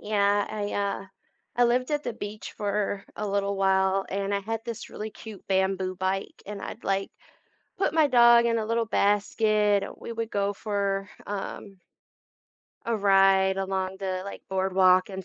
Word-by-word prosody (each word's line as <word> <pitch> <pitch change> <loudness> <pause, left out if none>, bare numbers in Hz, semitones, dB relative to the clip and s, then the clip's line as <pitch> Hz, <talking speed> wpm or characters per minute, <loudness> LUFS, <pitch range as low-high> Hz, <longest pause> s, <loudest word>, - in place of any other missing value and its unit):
Yeah, 205 -1 +2
I, 205 -1 -3
uh 200 -1 -2 0.5
I 245 - +4
lived 250 +3 +1
at 295 - 0
the 240 - -2
beach 210 -1 -7
for 205 -1 -2
a 210 - -3
little 200 0 0
while, 190 0 +2
and 195 +1 -2
I 200 - 0
had 225 +3 -4
this 235 -2 -6
really 215 +1 -6
cute 220 -3 -11
bamboo 190 -1 0
bike, 190 +1 -3
and 205 -1 -6
I'd, 220 - -7
like, 195 0 -1 0.7
put 350 -5 0
my 315 -1 +5
dog 235 -3 +6
in 230 -1 +2
a 220 - -2
little 230 +1 0
basket, 205 0 +2
we - - -7
would 230 -1 -3
go 200 -1 0
for, 200 -1 -2 0.2
um 200 -1 -6 1.1
a 230 -1 0
ride 195 -1 +4
along 190 0 -2
the, 185 -1 -3
like, 200 - -8
boardwalk 185 -1 +3
and 190 -2 -7
200 Hz, 165 wpm, -27 LUFS, 195-215 Hz, 1.1 s, dog